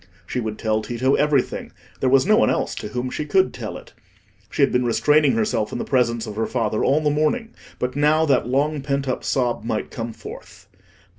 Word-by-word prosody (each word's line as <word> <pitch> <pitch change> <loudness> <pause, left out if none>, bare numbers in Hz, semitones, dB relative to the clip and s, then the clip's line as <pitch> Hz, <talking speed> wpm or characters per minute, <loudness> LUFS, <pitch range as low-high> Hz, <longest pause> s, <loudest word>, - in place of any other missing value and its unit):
She 125 - -3
would 110 -2 -4
tell 110 -1 0
Tito 120 +4 0
everything; 145 -3 +1 0.3
there 130 - +2
was 135 +3 +4
no 215 +2 +5
one 235 - +4
else - - 0
to - - -6
whom 125 +3 -3
she - - -3
could 190 +6 +2
tell 115 -4 -6
it. - - -14 0.6
She - - +1
had - - +3
been 125 0 +2
restraining 150 +5 +3
herself 215 - 0
in - - -3
the - - -2
presence 120 -3 +1
of 105 -1 -7
her 110 - 0
father 110 -3 -1
all 145 +3 +3
the 150 -1 +1
morning; 225 +11 0 0.2
but 125 +1 -3
now, 150 +2 +3
that 135 -5 +2
long 145 +3 0
pent 140 0 -2
up 130 - -2
sob 125 -3 0
might 110 -1 -3
come 115 0 -4
forth. 100 -4 -11
130 Hz, 215 wpm, -22 LUFS, 115-150 Hz, 0.6 s, no